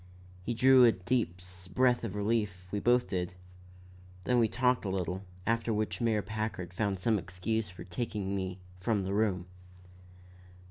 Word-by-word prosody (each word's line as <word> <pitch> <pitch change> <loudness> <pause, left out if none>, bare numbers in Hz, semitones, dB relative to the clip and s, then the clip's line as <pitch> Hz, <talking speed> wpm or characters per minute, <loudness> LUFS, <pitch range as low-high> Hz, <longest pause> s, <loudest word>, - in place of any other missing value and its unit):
He 115 +6 -3
drew 130 +1 +7
a 120 - +8
deep 90 -2 -1 0.4
breath 125 -2 +3
of 110 -3 -4
relief; 105 -3 -1
we 105 - -1
both 125 +3 +3
did; 90 -1 -2 0.9
then 125 +3 +2
we 115 - +4
talked 125 +2 +1
a 100 - -2
little, 95 0 -2 0.2
after 115 0 +1
which 110 +2 -1
Mayor 110 -3 +2
Packard 105 -4 -4
found 100 0 0
some 110 +3 +2
excuse 95 +4 -2
for 90 - -10
taking 100 0 -3
me 95 -1 -3 0.2
from 105 +1 0
the 95 +1 -2
room. 100 -4 +1
105 Hz, 155 wpm, -31 LUFS, 95-115 Hz, 0.9 s, a